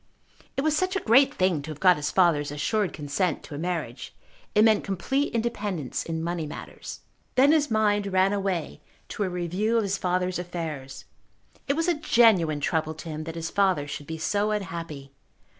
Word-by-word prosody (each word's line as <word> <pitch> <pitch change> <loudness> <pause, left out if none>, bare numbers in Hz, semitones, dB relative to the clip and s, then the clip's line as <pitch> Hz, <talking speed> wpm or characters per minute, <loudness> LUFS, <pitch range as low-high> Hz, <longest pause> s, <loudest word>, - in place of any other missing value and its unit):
It - - +2
was 310 +1 +2
such 370 +4 0
a - - +2
great 265 +2 +5
thing 185 -5 +1
to 150 - -9
have 150 -2 -7
got 185 -1 +6
his 150 -1 -2
father's 165 -6 +3
assured 180 +7 0
consent 150 +3 -2
to - - -10
a 145 - -5
marriage. 175 0 -4 0.4
It 210 - +6
meant 220 -2 +4
complete 270 +9 -1
independence 210 - -2
in 160 -1 -3
money 170 -2 -2
matters. 150 - -8 0.3
Then 275 +3 +6
his 300 -2 +3
mind 210 -2 +2
ran 190 +1 +2
away 195 -5 -2 0.3
to - - -6
a 190 - -1
review 180 +6 0
of 225 - +2
his 195 -1 -1
father's 180 0 0
affairs. 160 -7 -6 0.6
It 280 - +2
was 330 +2 0
a 350 - +4
genuine 215 - +3
trouble 160 +1 0
to 160 +1 -8
him 155 0 -5
that 165 0 -6
his 165 0 -4
father 190 -7 +2
should 145 0 -7
be 160 - -5
so 205 +6 0
unhappy. 165 -9 -4
180 Hz, 190 wpm, -26 LUFS, 160-215 Hz, 0.6 s, got